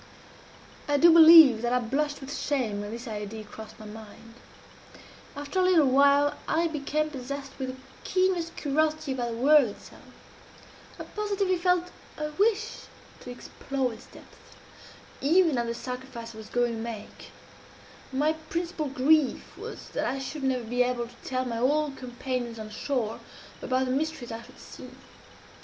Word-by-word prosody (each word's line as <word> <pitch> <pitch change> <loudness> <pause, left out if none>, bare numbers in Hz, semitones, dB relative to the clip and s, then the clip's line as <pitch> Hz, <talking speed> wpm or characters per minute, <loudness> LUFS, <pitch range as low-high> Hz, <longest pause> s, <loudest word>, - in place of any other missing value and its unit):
I 290 0 +2
do 335 +3 +7
believe 320 -8 +9
that 240 0 -1
I - - +4
blushed 280 +5 -1
with 275 +2 -6
shame 235 -8 -1
when 205 - -6
this 235 +3 -7
idea 215 0 -6
crossed 215 +1 -11
my 215 - -10
mind. 220 +1 -12 1.0
After 290 +6 -3
a - - +4
little 360 -5 +5
while 280 +2 +4
I 335 +1 +1
became 305 -1 -1
possessed 275 0 -6
with 260 -1 -3
the 255 - -6 0.3
keenest 370 -3 0
curiosity 310 0 0
about 245 -2 -2
the 230 - -5
whirl 285 +1 +6
itself. 205 - -12 1.0
I - - -4
positively 400 -3 -1
felt 360 0 +1 0.3
a 300 0 -3
wish 430 +5 0 0.3
to - - -11
explore 255 +1 -4
its 220 - -14
depths, - - -17 0.7
even 320 -2 +3
at 235 - -1
the 235 - -3
sacrifice 250 -2 -7
I 220 - -11
was 215 - -11
going 240 -1 0
to - - -6
make; 225 -2 -8 0.8
and 265 - -4
my 310 +1 +3 0.2
principal 335 -3 -2
grief 280 +2 +2
was - - -9
that - - -2
I 275 - -1
should 275 +3 -6
never 260 -2 0
be 245 +2 -1
able 245 -1 0
to - - -17
tell 255 -1 -2
my 230 -2 -3
old 290 +3 +1
companions 245 -2 -4
on 215 -1 -8
shore 225 -1 -2 0.4
about 260 0 0
the 255 - -2
mysteries 285 -3 -2
I 225 0 -6
should - - -16
see. - - -11
270 Hz, 165 wpm, -27 LUFS, 240-310 Hz, 1.0 s, believe